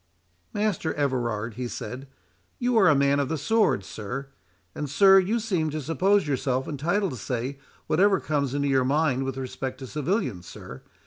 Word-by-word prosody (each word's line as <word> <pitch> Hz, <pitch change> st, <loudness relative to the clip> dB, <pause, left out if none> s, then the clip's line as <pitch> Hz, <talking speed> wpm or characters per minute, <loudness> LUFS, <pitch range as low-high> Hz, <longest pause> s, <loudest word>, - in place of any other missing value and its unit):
"Master 205 Hz, -6 st, -1 dB
Everard," 120 Hz, -6 st, -1 dB
he 125 Hz, -1 st, -3 dB
said, 130 Hz, +3 st, -7 dB, 0.5 s
"you 245 Hz, 0 st, 0 dB
are 205 Hz, -4 st, +6 dB
a 155 Hz, -, +6 dB
man 140 Hz, +1 st, +3 dB
of 140 Hz, -, 0 dB
the 160 Hz, -, -1 dB
sword, 210 Hz, -, +2 dB
sir; 125 Hz, +8 st, -6 dB, 0.4 s
and, 150 Hz, -1 st, -4 dB
sir, 195 Hz, +7 st, +7 dB
you 205 Hz, +5 st, 0 dB
seem 185 Hz, -8 st, -1 dB
to 155 Hz, +1 st, -3 dB
suppose 180 Hz, +5 st, +2 dB
yourself 130 Hz, -1 st, -1 dB
entitled 170 Hz, +7 st, 0 dB
to 130 Hz, -, -6 dB
say 125 Hz, +5 st, -3 dB, 0.3 s
whatever 195 Hz, +4 st, +3 dB
comes 140 Hz, -3 st, -1 dB
into 145 Hz, 0 st, 0 dB
your 135 Hz, -2 st, +3 dB
mind 135 Hz, -1 st, +1 dB
with 135 Hz, -1 st, -4 dB
respect 130 Hz, 0 st, -5 dB
to 135 Hz, -, -8 dB
civilians, 135 Hz, -, -2 dB
sir. 65 Hz, -, -10 dB
140 Hz, 175 wpm, -26 LUFS, 130-180 Hz, 0.5 s, sir